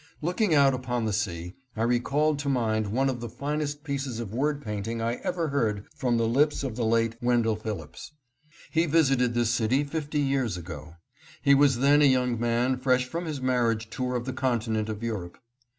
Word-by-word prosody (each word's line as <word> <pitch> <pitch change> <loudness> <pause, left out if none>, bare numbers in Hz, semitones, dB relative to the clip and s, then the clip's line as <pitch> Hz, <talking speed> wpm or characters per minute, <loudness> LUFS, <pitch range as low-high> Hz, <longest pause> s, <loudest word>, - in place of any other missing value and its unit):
Looking 180 +2 +1
out 140 -2 +5
upon 125 -2 -2
the 110 - -1
sea 90 -4 -3 0.2
I 110 - 0
recalled 140 +5 +1
to 145 -1 -2
mind 110 -5 0
one 130 +7 +1
of 130 -2 -2
the 120 0 -6
finest 145 +3 -3
pieces 140 -5 -3
of 110 -3 -6
word 145 +4 0
painting 110 -2 -4
I 115 +1 -1
ever 170 -3 -2
heard 110 -7 -1
from 120 -2 0
the 115 -1 +1
lips 140 +5 +2
of 130 -5 -3
the 120 - -2
late 115 0 +1
Wendell 120 -2 +2
Phillips. 110 - -7 0.6
He 165 +2 +2
visited 135 -6 +3
this 120 -1 +2
city 120 +4 +2
fifty 150 0 -3
years 135 -8 0
ago. 85 -1 -9 0.5
He 140 - +6
was 140 -2 +4
then 145 +2 +5
a - - +6
young 125 -3 +2
man 120 +2 +1
fresh 125 -1 +2
from 170 +7 -4
his 150 -4 -4
marriage 115 -3 0
tour 125 +1 -2
of 120 -1 -2
the 130 - -3
continent 115 -4 -1
of 110 +1 -5
Europe. 100 -7 -4
125 Hz, 195 wpm, -27 LUFS, 115-140 Hz, 0.6 s, He